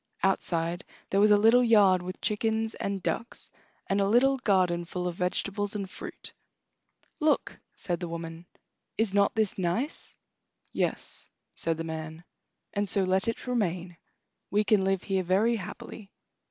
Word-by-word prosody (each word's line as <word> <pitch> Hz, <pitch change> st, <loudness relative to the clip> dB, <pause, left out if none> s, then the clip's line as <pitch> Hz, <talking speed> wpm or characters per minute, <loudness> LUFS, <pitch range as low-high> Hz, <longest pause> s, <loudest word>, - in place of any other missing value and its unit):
Outside 175 Hz, -2 st, 0 dB, 0.3 s
there 195 Hz, -, +3 dB
was 210 Hz, +1 st, +6 dB
a 210 Hz, -, +7 dB
little 225 Hz, +4 st, +5 dB
yard 205 Hz, -6 st, +5 dB
with 185 Hz, +1 st, -7 dB
chickens 220 Hz, +1 st, 0 dB
and 200 Hz, -2 st, -3 dB
ducks, 235 Hz, -, -4 dB, 0.3 s
and 195 Hz, +1 st, +1 dB
a 195 Hz, -, +2 dB
little 265 Hz, +6 st, +4 dB
garden 185 Hz, -7 st, +2 dB
full 180 Hz, +1 st, -4 dB
of 175 Hz, -, -2 dB
vegetables 200 Hz, +3 st, -1 dB
and 200 Hz, -2 st, -3 dB
fruit. -, -, -9 dB, 0.9 s
"Look!" 310 Hz, -1 st, +1 dB, 0.2 s
said 175 Hz, -3 st, -3 dB
the 175 Hz, -, -4 dB
woman, 165 Hz, 0 st, -7 dB, 0.5 s
"is 220 Hz, -3 st, +1 dB
not 200 Hz, 0 st, +3 dB
this 215 Hz, -3 st, 0 dB
nice?" 205 Hz, -, -2 dB, 0.6 s
"Yes," -, -, -2 dB, 0.3 s
said 165 Hz, -1 st, -1 dB
the 165 Hz, -, -3 dB
man; 160 Hz, 0 st, -6 dB, 0.5 s
"and 205 Hz, -1 st, -1 dB
so 195 Hz, 0 st, +2 dB
let 190 Hz, +2 st, +2 dB
it 230 Hz, -, -2 dB
remain. 185 Hz, -8 st, -1 dB, 0.5 s
We 210 Hz, +1 st, +2 dB
can 205 Hz, -2 st, +3 dB
live 195 Hz, -1 st, +1 dB
here 190 Hz, -2 st, 0 dB
very 195 Hz, +6 st, +2 dB
happily." 200 Hz, +1 st, -8 dB
195 Hz, 155 wpm, -28 LUFS, 175-215 Hz, 0.9 s, a